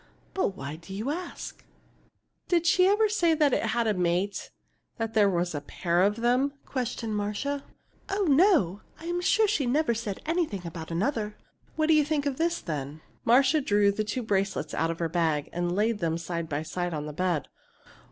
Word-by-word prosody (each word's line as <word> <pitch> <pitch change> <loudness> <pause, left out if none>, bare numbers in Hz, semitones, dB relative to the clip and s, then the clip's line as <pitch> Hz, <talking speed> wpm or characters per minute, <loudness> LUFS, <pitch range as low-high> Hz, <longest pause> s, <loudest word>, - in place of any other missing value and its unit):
But 285 - -1
why 140 +3 -6
do 180 +4 -9
you 225 +8 -2
ask?" 350 +3 -6 0.8
"Did 345 -2 +2
she 365 +2 +5
ever 420 +2 +4
say 405 -5 +2
it 310 -1 +2
had 235 -1 +1
a 215 - +2
mate 180 +2 -1 0.5
that 225 -1 -3
there 210 -2 +5
was 175 -2 0
a 145 - -3
pair 170 +4 0
of 205 +2 +3
them?" 250 +4 +2
questioned 240 -4 -3
Marcia. 210 +8 -2 0.5
"Oh, 400 +1 0
no! 280 - +4 0.2
I'm 345 +2 -2
sure 435 +4 +3
she 310 -11 +1
never 275 0 +2
said 220 -4 -4
anything 310 - -1
about 165 -1 -7
another." 210 - -1 0.4
"What 310 - +2
do 320 - +4
you 305 -1 +5
think 295 -1 -1
of 275 -2 -1
this, 340 +1 +1
then?" 150 -1 -5 0.2
Marcia 265 +5 +5
drew 205 -5 +3
the 215 +2 -1
two 225 +4 -3
bracelets 195 -6 -1
out 165 - 0
of 165 - -3
her 170 - -1
bag, 160 -3 0
and 175 0 -1
laid 215 +1 +1
them 165 -1 0
side 170 -1 -4
by 145 +1 -2
side 175 +1 -3
on 150 0 -4
the 150 - -6
bed. 175 -2 0
210 Hz, 190 wpm, -27 LUFS, 175-290 Hz, 0.8 s, she